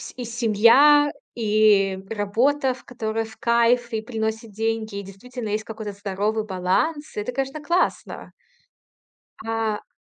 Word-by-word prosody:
и 250 - -6
семья, 235 +6 +5 0.2
и 210 -4 +3
работа, 235 +7 +1
ф 255 0 -4
которая 225 -2 -3
в 220 0 -14
кайф 235 +1 +2
и 220 - -1
приносит 220 -1 -4
деньги. 220 0 -2
И - - -6
действительно 220 +4 -8
есть 210 +1 -1
какой-то 220 -1 -6
здоровый 205 +2 -2
баланс. 215 - -1
Это, 210 +4 -3
конечно, 270 +4 -3
классно. 340 +5 -1 1.1
А. 225 -2 -2
225 Hz, 125 wpm, -23 LUFS, 210-250 Hz, 1.1 s, семья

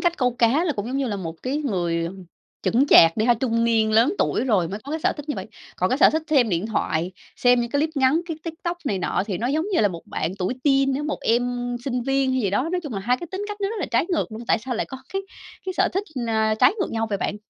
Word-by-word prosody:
cách 345 -1 +1
câu 250 -2 +2
cá 255 +9 +3
là 320 - +1
cũng 205 -3 -4
giống 260 +3 -3
như 275 -1 0
là 205 - -2
một 165 -4 -5
cái 265 +3 -1
người, 175 - -1
ừm, 185 +2 -7 0.4
chững 255 +5 +2
chạc 165 - +7
đi 215 - +1
ha, 240 - +5
trung 230 -1 0
niên 220 -2 +2
lớn 240 - +4
tuổi - - +1
rồi 195 -9 +2
mới 200 +4 -5
có 285 - -7
cái 320 - -2
sở - - +2
thích 295 +1 -10
như 295 - -1
vậy. - - -5 0.3
Còn - - +1
cái - - +1
sở - - +7
thích 315 0 -1
xem 260 -7 +4
điện 180 +3 -1
thoại, 180 -4 -1 0.2
xem 245 -1 +4
những 235 0 -3
cái 285 - +1
clip 315 +1 0
ngắn, 275 +4 +3
cái 325 - -4
TikTok 340 +1 -4
này 200 -8 -1
nọ 185 - 0
thì 195 -4 -3
nó 235 - -1
giống 310 +7 0
như - - +3
là 205 - +4
một 170 -2 -7
bạn 165 - -3
tuổi 185 +7 -1
teen 275 -1 +3
á, 290 - -2
một 300 - -3
em 245 +1 0
sinh 250 -3 -1
viên 270 0 +1
hay 260 - +1
gì 200 - 0
đó, 255 +10 0
nói 360 - 0
chung 295 -7 -6
là 195 - -3
2 245 +5 +1
cái 345 - -8
tính 390 +2 -4
cách 415 - -5
nó 395 - 0
rất 450 - -5
là 335 - -2
trái 235 +8 +2
ngược 330 -9 -1
luôn. 225 +2 -7
Tại - - +4
sao 245 +2 -4
lại - - -2
có 265 - -8 0.2
cái 390 0 -1 0.4
cái 375 - -1
sở - - +2
thích, 390 - 0 0.2
a, 220 -1 +1
trái 220 - +5
ngược 390 - -1
nhau 225 0 -1
vậy 200 - -1
bạn? 205 - -2
245 Hz, 300 wpm, -23 LUFS, 215-295 Hz, 0.4 s, chạc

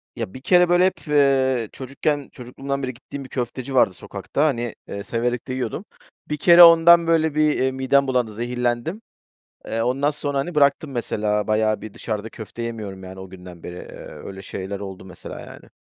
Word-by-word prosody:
Ya, 95 - -5
bir 130 - -9
kere 180 +4 +4
böyle 175 +1 +5
hep, 185 -3 -2
eee, 135 -5 +2
çocukken, 140 +2 -3
çocukluğumdan 135 +2 -5
beri 130 -1 -3
gittiğim 135 +3 -9
bir 130 - -12
köfteci 130 +1 -4
vardı 95 -7 +4
sokakta, 145 - -3
hani, 120 -6 -1
eee, 100 0 -6
severek 120 +1 -2
de 130 - -3
yiyordum. 130 +8 -3 0.4
Bir 150 - -1
kere 170 +3 +8
ondan 170 0 +8
böyle 160 -2 +2
bir, 155 -1 +2
eee, 130 0 +2
midem 130 +1 +2
bulandı, 125 -4 0
zehirlendim. 120 - -2 0.7
Eee, 115 0 -2
ondan 135 +4 +1
sonra, 145 -1 -3
hani, 165 +5 -3
bıraktım, 140 +1 +3
mesela, 105 -4 -1
bayağı 110 0 +1
bir 110 -2 -9
dışarıda 110 -1 -4
köfte 115 +1 -8
yemiyorum, 105 -5 -6
yani, 95 +1 -9
o 95 - -9
günden 90 -2 -12
beri, 90 - -7
eee, - - -10
öyle 95 0 -9
şeyler 95 +1 -6
oldu 95 -2 -8
mesela, 90 -3 -9
yani. - - -13
130 Hz, 185 wpm, -22 LUFS, 110-145 Hz, 0.7 s, kere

